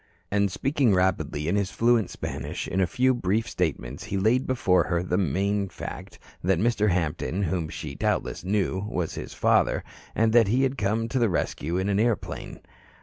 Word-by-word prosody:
And 100 Hz, -1 st, +2 dB
speaking 135 Hz, -, +2 dB
rapidly 90 Hz, -5 st, 0 dB
in 90 Hz, -, +1 dB
his 100 Hz, -2 st, 0 dB
fluent 115 Hz, -3 st, +2 dB
Spanish, -, -, -5 dB
in 95 Hz, -, 0 dB
a 90 Hz, -, +3 dB
few 130 Hz, +7 st, +2 dB
brief 110 Hz, 0 st, 0 dB
statements, 70 Hz, -, -3 dB
he 100 Hz, -, -2 dB
laid 115 Hz, +7 st, +2 dB
before 120 Hz, -8 st, +2 dB
her 85 Hz, -1 st, 0 dB
the 90 Hz, -, -1 dB
main 100 Hz, +3 st, 0 dB
fact -, -, -8 dB, 0.3 s
that 95 Hz, 0 st, +2 dB
Mr. 105 Hz, +1 st, +2 dB
Hampton, 85 Hz, 0 st, -1 dB
whom 85 Hz, -2 st, -1 dB
she 75 Hz, -2 st, -6 dB
doubtless -, -, -1 dB
knew, 95 Hz, -1 st, 0 dB
was 90 Hz, -5 st, -2 dB
his -, -, -7 dB
father, -, -, +2 dB, 0.3 s
and 110 Hz, 0 st, +2 dB
that 115 Hz, -3 st, +6 dB
he 125 Hz, +6 st, +2 dB
had 135 Hz, 0 st, +1 dB
come 110 Hz, 0 st, 0 dB
to 130 Hz, -, 0 dB
the 115 Hz, -2 st, +3 dB
rescue 85 Hz, -1 st, -1 dB
in 95 Hz, +1 st, 0 dB
an 100 Hz, 0 st, +1 dB
airplane. 115 Hz, 0 st, -2 dB
100 Hz, 185 wpm, -26 LUFS, 90-115 Hz, 0.3 s, that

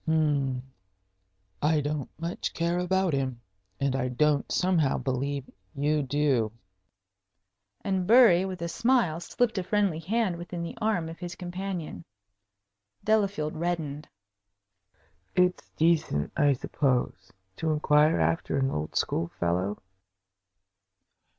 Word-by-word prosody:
"Hm 145 Hz, -5 st, +1 dB, 1.0 s
I 155 Hz, +1 st, +3 dB
don't 145 Hz, -1 st, -2 dB
much 170 Hz, +2 st, -4 dB
care 170 Hz, +1 st, 0 dB
about 185 Hz, -1 st, +1 dB
him. 130 Hz, -3 st, -1 dB, 0.4 s
And 140 Hz, -1 st, 0 dB
I 130 Hz, -1 st, 0 dB
don't 145 Hz, +3 st, +1 dB
somehow 175 Hz, -7 st, +2 dB
believe 135 Hz, +1 st, -2 dB, 0.3 s
you 150 Hz, +2 st, +1 dB
do." 135 Hz, -5 st, +1 dB, 1.3 s
And 190 Hz, -2 st, -1 dB
Bury, 225 Hz, -6 st, +7 dB
with 185 Hz, -2 st, -4 dB
a -, -, -1 dB
smile, 230 Hz, -5 st, +2 dB
slipped 220 Hz, +4 st, 0 dB
a -, -, -2 dB
friendly 200 Hz, -4 st, +1 dB
hand 190 Hz, +1 st, 0 dB
within 175 Hz, 0 st, -5 dB
the 170 Hz, -, -6 dB
arm 215 Hz, -7 st, +1 dB
of 165 Hz, 0 st, -9 dB
his 175 Hz, -1 st, -6 dB
companion. 180 Hz, -, -5 dB, 1.0 s
Delafield 200 Hz, -8 st, +1 dB
reddened. 155 Hz, -3 st, -3 dB, 1.3 s
"It's 180 Hz, 0 st, +2 dB
decent, 155 Hz, -, +1 dB
I 145 Hz, -1 st, +4 dB
suppose, 125 Hz, -7 st, -1 dB, 0.3 s
to 160 Hz, -, -1 dB
inquire 150 Hz, 0 st, +3 dB
after 165 Hz, -, 0 dB
an 135 Hz, 0 st, +1 dB
old 75 Hz, +1 st, -4 dB
school 85 Hz, -, 0 dB
fellow?" 90 Hz, +4 st, -1 dB
160 Hz, 120 wpm, -28 LUFS, 140-180 Hz, 1.3 s, Bury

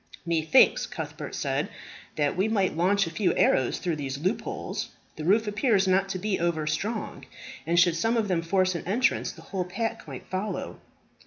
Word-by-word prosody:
"Methinks," 160 Hz, -2 st, +4 dB
Cuthbert -, -, -6 dB
said, -, -, -1 dB, 0.5 s
"that 145 Hz, -1 st, +1 dB
we 190 Hz, +4 st, +1 dB
might 200 Hz, -6 st, +1 dB
launch 195 Hz, +4 st, +2 dB
a 165 Hz, -, -6 dB
few 190 Hz, +3 st, +1 dB
arrows 130 Hz, -2 st, +3 dB
through 170 Hz, -3 st, -2 dB
these 135 Hz, -2 st, -4 dB
loopholes. 185 Hz, +10 st, -3 dB, 0.3 s
The 155 Hz, -, -6 dB
roof 215 Hz, +5 st, +4 dB
appears 205 Hz, -2 st, +2 dB
not 190 Hz, +1 st, +2 dB
to 190 Hz, -, -2 dB
be 200 Hz, +1 st, -1 dB
over 165 Hz, -2 st, 0 dB
strong; 210 Hz, +9 st, -3 dB, 0.4 s
and 170 Hz, +1 st, +3 dB
should 170 Hz, -1 st, +4 dB
some 225 Hz, +7 st, +1 dB
of 220 Hz, -2 st, +1 dB
them 180 Hz, -3 st, +1 dB
force 185 Hz, +2 st, +1 dB
an 170 Hz, -, -5 dB
entrance, 230 Hz, +7 st, +1 dB
the 165 Hz, -, -14 dB
whole 190 Hz, +1 st, -3 dB
pack 225 Hz, +1 st, -4 dB
might 135 Hz, -3 st, -8 dB
follow." 190 Hz, +3 st, -4 dB
185 Hz, 180 wpm, -27 LUFS, 165-205 Hz, 0.5 s, Methinks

